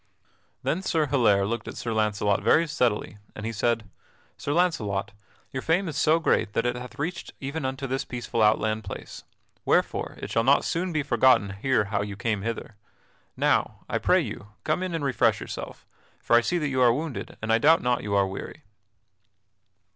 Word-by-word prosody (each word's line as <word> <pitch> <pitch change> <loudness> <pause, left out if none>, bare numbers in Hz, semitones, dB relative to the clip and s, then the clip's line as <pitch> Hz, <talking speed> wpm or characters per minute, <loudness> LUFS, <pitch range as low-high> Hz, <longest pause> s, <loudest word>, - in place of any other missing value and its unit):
Then 170 - 0
Sir 160 -5 +1
Hilaire 115 -8 +3
looked 115 +3 -3
at - - -7
Sir 115 - -3
Launcelot 105 -2 +1
very 165 - +4
steadily, 120 -8 -1 0.2
and 110 - -6
he 115 - -2
said: 115 -1 0 0.5
"Sir 145 - -4
Launcelot, 105 - 0 0.4
your 130 - -3
fame 175 +6 +1
is 155 - -4
so 155 +1 +4
great 165 -9 +1
that 115 - 0
it 120 0 0
hath 125 0 -8
reached 170 +5 -4
even 140 +2 -4
unto 130 +1 -3
this 135 +1 -2
peaceful 120 -3 -3
outland 110 0 +2
place; - - -8 0.4
wherefore - - 0
it - - -6
shall 115 - +2
not 135 +3 +4
soon 180 +2 -1
be 155 -3 0
forgotten 120 -6 +4
here 110 +4 +1
how 100 - +2
you 100 -1 -4
came 105 0 -1
hither. 115 0 -5 0.6
Now, - - +1
I - - -1
pray - - +4
you, 105 - -6 0.2
come 155 +4 0
in 185 -2 -2
and 155 -3 -2
refresh 120 -5 +2
yourself, - - -7 0.3
for 120 - +2
I 120 - +7
see 175 +9 0
that 150 -4 -1
you 130 -1 0
are 120 -1 +6
wounded 150 +1 -4
and 110 +1 0
I 115 - +4
doubt 160 +6 +5
not 125 0 +1
you 100 -1 -2
are 100 -1 +4
weary." 95 0 -7
125 Hz, 190 wpm, -26 LUFS, 110-150 Hz, 0.6 s, I